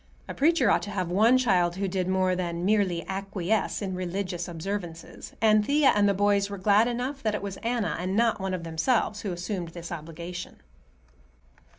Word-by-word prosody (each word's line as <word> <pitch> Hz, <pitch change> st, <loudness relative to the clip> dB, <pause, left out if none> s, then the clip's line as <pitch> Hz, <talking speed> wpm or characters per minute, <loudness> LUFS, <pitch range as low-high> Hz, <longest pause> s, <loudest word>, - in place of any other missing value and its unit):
A -, -, -5 dB
preacher 280 Hz, -7 st, +3 dB
ought -, -, +3 dB
to 205 Hz, -, -6 dB
have 185 Hz, -4 st, -3 dB
one 220 Hz, +7 st, +5 dB
child 180 Hz, -8 st, +2 dB
who 195 Hz, +1 st, -2 dB
did 185 Hz, -1 st, -2 dB
more 185 Hz, -1 st, +1 dB
than 175 Hz, -1 st, -3 dB
merely 190 Hz, -5 st, +1 dB
acquiesce 195 Hz, +2 st, -2 dB
in 190 Hz, -1 st, -3 dB
religious 180 Hz, -1 st, -3 dB
observances, 175 Hz, -1 st, -6 dB
and 215 Hz, -1 st, +4 dB
Thea 285 Hz, +4 st, +4 dB
and 205 Hz, -1 st, +4 dB
the 200 Hz, -, +1 dB
boys 200 Hz, 0 st, +2 dB
were 200 Hz, -, -5 dB
glad 205 Hz, +4 st, +4 dB
enough 250 Hz, +3 st, -3 dB
that 215 Hz, -3 st, 0 dB
it 210 Hz, -, -4 dB
was 195 Hz, -1 st, -5 dB
Anna 235 Hz, -2 st, -1 dB
and 185 Hz, +2 st, -2 dB
not 230 Hz, -2 st, +2 dB
one 190 Hz, -1 st, -1 dB
of 175 Hz, -, -6 dB
themselves 205 Hz, +6 st, 0 dB
who 200 Hz, -, -3 dB
assumed 175 Hz, 0 st, -4 dB
this 170 Hz, +1 st, -9 dB
obligation. 170 Hz, +2 st, -7 dB
195 Hz, 190 wpm, -27 LUFS, 175-210 Hz, -, one